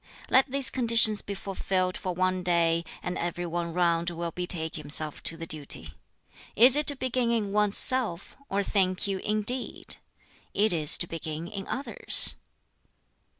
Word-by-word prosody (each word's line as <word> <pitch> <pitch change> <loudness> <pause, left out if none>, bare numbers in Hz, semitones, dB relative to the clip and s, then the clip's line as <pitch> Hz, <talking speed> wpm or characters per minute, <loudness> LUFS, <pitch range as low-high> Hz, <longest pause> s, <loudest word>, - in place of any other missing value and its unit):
Let 265 +2 +4
these 275 0 +4
conditions 230 -4 +4
be 200 - -6
fulfilled 185 -1 -2
for 185 -2 -5
one 185 0 0
day, 170 -1 +1 0.2
and 180 - -4
every 175 0 -4
one 170 0 -4
round 170 0 0
will 170 0 -5
betake 170 -2 -3
himself 150 0 -1
to 165 - -2
the 165 - -7
duty. 140 - -3 0.6
Is 245 +4 +7
it 295 0 0
to 285 - +5
begin 255 -2 -1
in 220 -4 -1
one's 210 0 +1
self, 235 -9 +1
or 200 +1 -1
think 185 -2 0
you, 195 -1 -2
indeed! 215 +6 -2 0.6
it 210 -1 +3
is 155 -3 +3
to - - +3
begin 160 0 -6
in 195 +1 -7
others?" 275 - +3
185 Hz, 155 wpm, -27 LUFS, 170-215 Hz, 0.6 s, Is